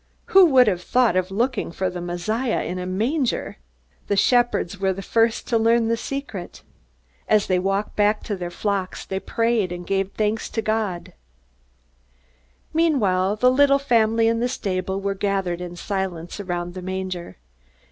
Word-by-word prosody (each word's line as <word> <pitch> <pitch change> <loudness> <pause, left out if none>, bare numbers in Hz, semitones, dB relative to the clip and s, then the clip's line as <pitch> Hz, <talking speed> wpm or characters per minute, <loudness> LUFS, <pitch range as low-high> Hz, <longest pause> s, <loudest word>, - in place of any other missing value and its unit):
Who 380 -2 +8
would 260 -4 +6
have 185 -5 0
thought 245 -1 +2
of 185 0 +1
looking 235 +1 -1
for 185 +2 -2
the 180 -1 -5
Messiah 215 +8 -1
in 180 +2 -4
a 180 - -4
manger! 235 - -1 0.5
The 200 - 0
shepherds 240 -4 +2
were 190 -1 +1
the 195 +1 -7
first 225 +2 +1
to 230 -2 +2
learn 230 0 +3
the 230 - +2
secret. 230 -7 -6 0.6
As 215 -1 +3
they 185 -1 +1
walked 195 +2 -1
back 210 +1 +2
to 205 - -3
their 175 -2 -5
flocks 195 +1 -3
they 190 - -3
prayed 230 -3 0
and 175 0 -6
gave 195 0 -1
thanks 215 +1 -1
to 225 - -2
God. 215 -5 -2 1.6
Meanwhile, 210 - +2
the 250 +4 +4
little 275 +1 +5
family 230 -4 +2
in 230 0 +1
the 245 +1 0
stable 190 -4 -2
were 200 0 -1
gathered 195 -3 -1
in 175 -1 -6
silence 185 -2 -4
around 175 -2 -4
the 185 - -7
manger. 185 - -5
200 Hz, 165 wpm, -23 LUFS, 185-230 Hz, 1.6 s, Who